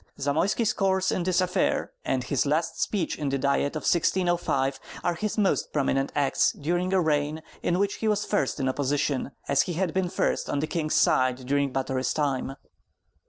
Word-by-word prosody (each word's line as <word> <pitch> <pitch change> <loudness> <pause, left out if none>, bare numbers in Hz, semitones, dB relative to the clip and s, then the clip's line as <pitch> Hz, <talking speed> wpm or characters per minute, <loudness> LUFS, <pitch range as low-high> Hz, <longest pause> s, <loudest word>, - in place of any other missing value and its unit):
Zamoyski's 170 - +1
course 190 -1 +1
in - - 0
this 185 +1 +2
affair, 185 +1 0
and 130 -1 -1
his 135 +3 0
last 155 +3 0
speech 190 -7 -1
in 145 -2 -1
the 135 - 0
Diet 140 +2 0
of 155 - -4
1605 170 -6 +1 0.2
are 175 - +1
his 210 +6 -3
most 200 -3 +1
prominent 135 -1 0
acts 140 -2 +2
during 175 +5 -1
a 190 - +3
reign 155 -1 0 0.2
in 175 - +1
which 200 +1 0
he 220 - -2
was 210 -1 +1
first 205 - 0
in 135 - 0
opposition, 140 0 0 0.2
as 140 -1 +3
he 175 - -2
had 175 -1 -1
been 185 -1 0
first - - -1
on - - -1
the 145 - 0
king's 155 -1 -1
side 130 0 +2
during 140 +1 +1
Batory's 130 0 -1
time. 135 -3 -1
155 Hz, 185 wpm, -26 LUFS, 140-180 Hz, 0.2 s, a